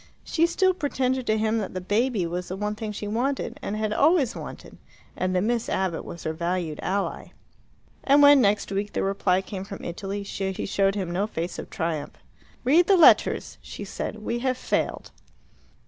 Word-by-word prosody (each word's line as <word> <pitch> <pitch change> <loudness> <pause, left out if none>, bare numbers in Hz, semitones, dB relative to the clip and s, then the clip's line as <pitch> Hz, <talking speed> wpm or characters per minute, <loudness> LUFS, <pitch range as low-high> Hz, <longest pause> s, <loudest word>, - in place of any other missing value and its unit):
She 335 0 +2
still 375 +2 +2
pretended 260 -6 -1
to 215 - +2
him 220 +1 +1
that 195 -3 -5
the - - -1
baby 210 +2 0
was 175 +2 -4
the 185 - -4
one 210 +1 -2
thing 215 0 -5
she 210 0 -5
wanted, 250 +6 -2
and 205 - -3
had 215 -1 -1
always 290 -2 +3
wanted, - - -9 0.4
and 185 0 -1
that 180 - +2
Miss 235 +1 0
Abbott 185 -3 -1
was 170 - -9
her 160 - -2
valued 170 -1 -2
ally. 200 +1 -3 0.7
And 285 +1 +5
when, 285 -1 +8
next 205 -2 +1
week, 200 +1 -2
the - - -1
reply 195 -1 +1
came 190 -1 -6
from 195 0 -9
Italy, 195 +3 -4
she 195 -1 -3
showed 195 0 +1
him 185 -4 -3
no 195 +4 0
face 170 -4 -4
of - - -7
triumph. 160 -6 -3 0.5
"Read 320 +8 +4
the 390 - +5
letters," 340 - +4
she - - -8
said. 215 0 -5
"We 235 +2 -2
have 255 0 0
failed." - - -2
205 Hz, 190 wpm, -25 LUFS, 185-250 Hz, 0.7 s, when